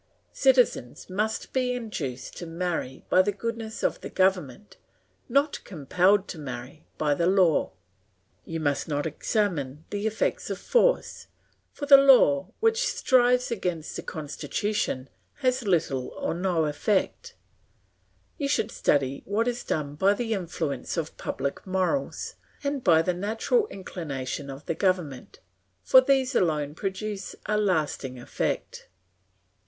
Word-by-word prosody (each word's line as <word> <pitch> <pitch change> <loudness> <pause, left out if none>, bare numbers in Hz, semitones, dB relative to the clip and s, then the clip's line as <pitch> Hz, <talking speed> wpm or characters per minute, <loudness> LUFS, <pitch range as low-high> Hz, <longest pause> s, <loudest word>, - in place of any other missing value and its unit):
Citizens 250 - +2
must 215 +3 -2
be 255 -1 +1
induced 160 - -5
to 175 - -7
marry 165 -6 -3
by 185 - +5
the 205 +2 +1
goodness 225 +2 -5
of - - 0
the - - -6
government, 190 -1 0 0.5
not 280 +4 +1
compelled 185 +5 +2
to 165 - -7
marry 130 +1 -8
by 150 -2 +2
law; 175 +1 +3 0.7
you 165 0 -5
must 145 -2 0
not 145 -1 -1
examine 160 - -1
the 205 +1 -1
effects 220 0 -1
of - - -2
force, - - +1 0.4
for 290 - -6
the 280 -1 +10
law 250 - +6
which 455 +2 +3
strives 250 - +3
against 180 -7 -3
the - - -4
constitution 155 -1 -3 0.3
has 255 -4 0
little 155 -8 +1
or - - -1
no 175 -2 0
effect; 150 +7 -1 1.0
you 285 - 0
should 230 -6 0
study 140 -1 +1
what 215 +4 +1
is 245 0 -2
done 145 -2 -2
by 195 +7 +3
the 225 0 -2
influence 165 - -3
of 160 -1 -3
public 140 +7 -4
morals 190 +9 -1 0.3
and 280 -2 -2
by 165 -2 +5
the 180 - +1
natural 220 - 0
inclination 145 - -5
of 135 +2 -9
the - - -1
government, 175 -8 -2 0.4
for 260 - +7
these 265 0 +2
alone 150 - +1
produce 195 +2 -4
a 210 - 0
lasting 155 -10 0
effect. 120 - -3
185 Hz, 135 wpm, -26 LUFS, 150-230 Hz, 1.0 s, the